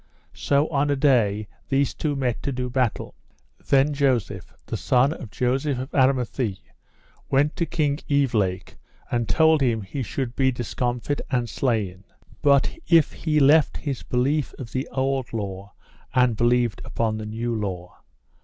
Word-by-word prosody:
So 145 +2 +1
on 145 -1 +1
a 145 - +2
day 115 -7 +2 0.2
these 140 0 +1
two 150 -2 -2
met 125 -4 -1
to 140 - -2
do 125 -1 -3
battle. 125 -3 -1 0.6
Then 140 +2 +4
Joseph, 135 -6 0
the - - -4
son 130 +4 +2
of 130 -8 -9
Joseph 130 +5 0
of 130 +2 -5
Aramathie, 125 -6 +1 0.7
went 145 +3 +2
to 170 - 0
King 145 -3 0
Evelake 110 -11 0 0.3
and 120 -2 -1
told 160 -2 +4
him 115 -5 +1
he 135 +8 -5
should 125 +1 -4
be 130 -1 +2
discomfit 120 +3 -2
and 125 -3 0
slain, 105 -8 -1 0.4
but 140 -2 +3
if 165 -3 +5
he 155 -2 0
left 145 +2 +4
his 140 -4 -4
belief 135 +4 -1
of 120 -4 -8
the 130 +1 -2
old 135 -2 -1
law 100 -2 -5 0.4
and 125 -2 +4
believed 120 -1 +1
upon 110 -1 -2
the 105 - -6
new 115 +2 -3
law. 95 -5 -5
130 Hz, 155 wpm, -24 LUFS, 115-140 Hz, 0.7 s, if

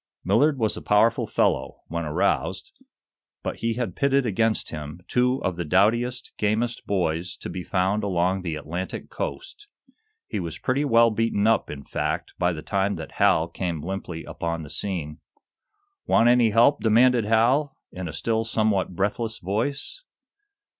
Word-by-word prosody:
Millard 145 -1 +3
was 110 -3 0
a - - -7
powerful 110 +3 +3
fellow, - - 0
when 85 0 -3
aroused, 75 - -1 0.7
but - - -3
he 115 0 -1
had 115 -7 -3
pitted 140 -1 +2
against 110 +1 0
him 75 +1 -7
two 125 +1 +2
of 90 -2 -1
the 85 - -2
doughtiest, 115 +9 +1
gamest 110 +3 -1
boys 90 -2 -1
to - - -7
be 90 - -4
found 95 +3 0
along 95 -1 +1
the 85 -4 -3
Atlantic 85 +5 -5
coast. 430 -4 -6 0.6
He - - -3
was 85 -3 -5
pretty 135 +3 0
well 115 -4 +5
beaten 110 -2 0
up, 115 0 +2
in 70 -1 -7
fact, - - -3
by 90 0 +2
the 80 -3 -6
time 100 +1 0
that 80 -2 -7
Hal 80 - +4
came 85 -4 -4
limply 90 -2 -5
upon 85 -1 -4
the 75 - -10
scene. 80 -6 -3 0.9
"Want 115 - +4
any 120 -1 +5
help?" 115 +5 +4
demanded 120 +1 +4
Hal, 125 +6 +2
in 90 -1 -6
a 80 - -6
still 110 +6 0
somewhat 110 -5 0
breathless 110 +4 -1
voice. 130 - -3
105 Hz, 160 wpm, -25 LUFS, 90-115 Hz, 0.9 s, well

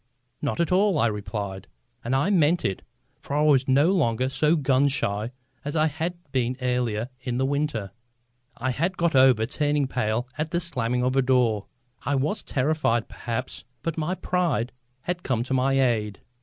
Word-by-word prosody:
"Not 145 +3 -2
at 170 - +1
all," 195 -1 +3
I 120 - +3
replied. 100 -3 -4 0.4
And 120 +3 0
I 145 +9 +2
meant 170 -2 +3
it. 95 - -1 0.4
For 140 - -5
I 150 - +3
was 140 -3 +4
no 140 +6 +4
longer 130 -8 +1
so 150 +4 +2
gun 140 -2 +3
shy 110 -4 -1 0.3
as 145 +2 -4
I 155 -1 +3
had 160 +3 -2 0.2
been 125 -1 0
earlier 125 -3 -1
in 125 -1 -3
the 130 - +1
winter. 140 -8 -1 0.7
I 130 +2 -1
had 175 +8 -1
got 170 -3 +1
over 130 -4 +5
turning 145 +3 0
pale 120 -1 -1
at 155 +1 -1
the 170 0 0
slamming 125 -7 -1
of 130 +1 +1
a 135 - +4
door. 125 -5 +2 0.4
I 145 - 0
was 150 +11 0
as - - -9
terrified, 135 -4 0
perhaps, 120 +3 -5 0.2
but 165 -2 -2
my 165 +3 -1
pride 170 -11 0 0.3
had 175 +5 -3
come 125 -6 0
to 130 - -3
my 135 +1 +2
aid. 110 -6 +1
130 Hz, 185 wpm, -25 LUFS, 120-155 Hz, 0.7 s, over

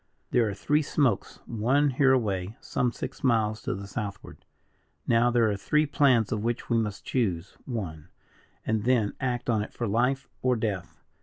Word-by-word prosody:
"There 115 -3 +3
are 100 - -4
three 150 +9 +2
smokes, 140 -7 0
one 130 +6 +2
hereaway, 115 -7 +1
some 125 -1 -1
six - - -7
miles 110 -4 +2
to - - -2
the 100 +1 -7
southward. 100 -1 -6 0.6
Now 115 +1 +4
there 120 -2 +3
are - - -1
three 150 +11 +2
plans, 130 -6 +3
of 110 -3 -1
which 120 +1 -2
we 115 - +4
must 105 -3 -3
choose 95 -9 -1
one, 90 - -5 0.6
and 110 -1 0
then 120 -5 +2
act 125 -2 -1
on 110 -3 +2
it 105 - -5
for 120 - -3
life 125 +6 +1
or 130 -1 +2
death. 105 -6 -4
115 Hz, 170 wpm, -27 LUFS, 105-125 Hz, 0.6 s, Now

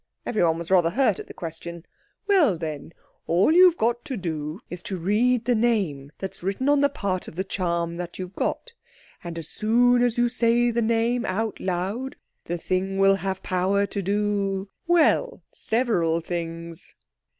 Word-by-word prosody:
Everyone 170 -8 +1
was 170 +1 -7
rather 175 -3 +5
hurt 220 0 +1
at - - -8
the - - -10
question. 170 0 -7 0.4
"Well, 345 - +4
then—all 165 - -2
you've 355 0 +6
got 235 +1 0
to 265 -4 -4
do 160 -2 -4
is 180 -1 -6
to 190 +1 -4
read 225 +7 +1
the 250 - +3
name 200 -12 0
that's 190 - -6
written 200 +9 -1
on 290 -1 +4
the 285 - +4
part 195 -9 -3
of - - -10
the 190 - -1
charm 170 -3 -2
that 175 -1 -6
you've 185 0 -6
got. 485 - -3 0.5
And 170 -1 -6
as 165 - -4
soon 245 +3 +3
as 245 -1 +2
you 240 0 +3
say 240 0 +2
the 235 +1 0
name 230 +2 +1
out 215 +2 -2
loud 195 +8 -3 0.3
the 175 - -3
thing 185 +3 -2
will 195 0 +5
have 190 0 -4
power 190 +2 +1
to 200 +1 -4
do—well, 205 - 0
several 195 -9 0
things." 165 -1 -6
195 Hz, 165 wpm, -25 LUFS, 175-235 Hz, 0.5 s, you've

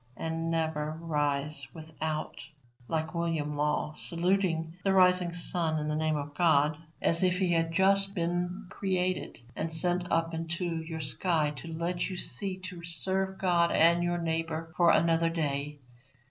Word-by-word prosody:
And 165 0 -2
never 160 -2 -1
rise 145 -3 -1
without, 155 -1 -4 0.5
like 160 -1 -2
William 165 -3 -1
Law, 150 +1 0
saluting 170 -1 0
the 195 - +2
rising 180 -2 +4
sun 170 -2 0
in 150 0 -2
the 150 - 0
name 155 0 +1
of 145 0 -5
God, 155 -3 +3 0.3
as 165 - +2
if 180 -1 +3
he 180 -2 +2
had 165 0 +1
just 195 +2 +3
been 175 +3 -2
created 185 -5 -1 0.2
and 160 - -3
sent 175 +2 -1
up 165 0 +1
into 165 +2 -3
your 160 0 -5
sky 155 0 0
to - - -8
let 170 +3 -2
you 185 - -5
see 185 +5 -2
to 180 -2 -8
serve 190 +3 0
God 175 -2 +3
and 170 +2 +5
your 175 0 0
neighbour 165 -1 -2
for 175 -1 +5
another 165 0 +3
day. 150 -3 -2
165 Hz, 155 wpm, -29 LUFS, 155-180 Hz, 0.5 s, and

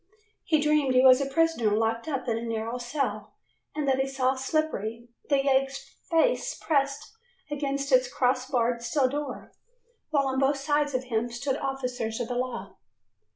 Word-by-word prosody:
He 310 -2 +3
dreamed 295 -3 +2
he 255 +1 +6
was 255 +1 +7
a 275 - -1
prisoner 275 -9 +2
locked 225 +2 0
up 270 -4 -3
in 230 - +1
a 230 - -3
narrow 230 +1 -3
cell, 275 +4 -3 0.4
and 300 -2 -2
that 265 -1 +2
he 265 - +1
saw 265 -1 +1
Slippery, 260 -5 -2 0.2
the 280 - +4
yegg's 270 0 +2 0.3
face - - +2
pressed 275 0 -1 0.4
against 280 -1 -2
its 255 -1 +4
cross 255 0 +1
barred 240 -2 +1
steel 255 +3 +1
door, 290 +2 -5 0.6
while 285 -3 +2
on 265 0 0
both 275 +1 +2
sides 290 0 0
of 255 - 0
him 240 -1 -1
stood 265 +3 -2
officers 250 -5 -3
of 240 0 -3
the 245 - -2
law. 255 +1 -4
265 Hz, 170 wpm, -27 LUFS, 245-280 Hz, 0.6 s, was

